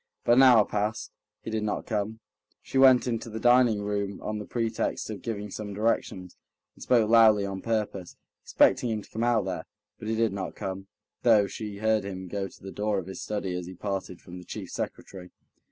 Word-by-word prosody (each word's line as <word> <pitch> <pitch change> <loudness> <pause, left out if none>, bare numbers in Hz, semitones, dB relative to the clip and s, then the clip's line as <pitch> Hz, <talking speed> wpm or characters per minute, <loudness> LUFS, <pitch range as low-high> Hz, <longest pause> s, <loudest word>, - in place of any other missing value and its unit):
But - - +2
an - - +8
hour 120 -5 +7
passed; 105 +2 -2 0.3
he - - -5
did 110 0 -1
not 105 -1 -2
come. 110 0 -3 0.4
She 135 - -1
went 130 -2 +7
into 115 -2 -3
the 110 0 -5
dining 120 -3 +4
room 100 -1 -2
on 105 0 -3
the 105 - -7
pretext 115 -1 -2
of 105 - -7
giving 105 -3 -5
some 105 -1 -6
directions, 100 -4 -1 0.4
and - - -20
spoke 115 -4 +3
loudly 110 -3 +6
on 95 -1 -5
purpose, 105 -5 -3 0.3
expecting 120 - +3
him 110 -2 -2
to - - -18
come 110 - -2
out 120 -4 +2
there; 90 -4 -4 0.3
but 110 - -7
he 110 - 0
did 115 -2 +1
not 95 -2 -5
come, 95 -1 -5 0.3
though 110 -4 +5
she 100 +1 -6
heard 110 0 +1
him 95 -1 -6
go 100 +2 -3
to - - -18
the 95 - -7
door 105 0 -1
of 95 - -3
his 95 -1 -7
study 100 -3 -3
as 90 -1 -4
he 95 - -9
parted 95 -2 -4
from 90 0 -10
the - - -11
chief - - -8
secretary. 90 -2 -6
105 Hz, 210 wpm, -27 LUFS, 95-110 Hz, 0.4 s, an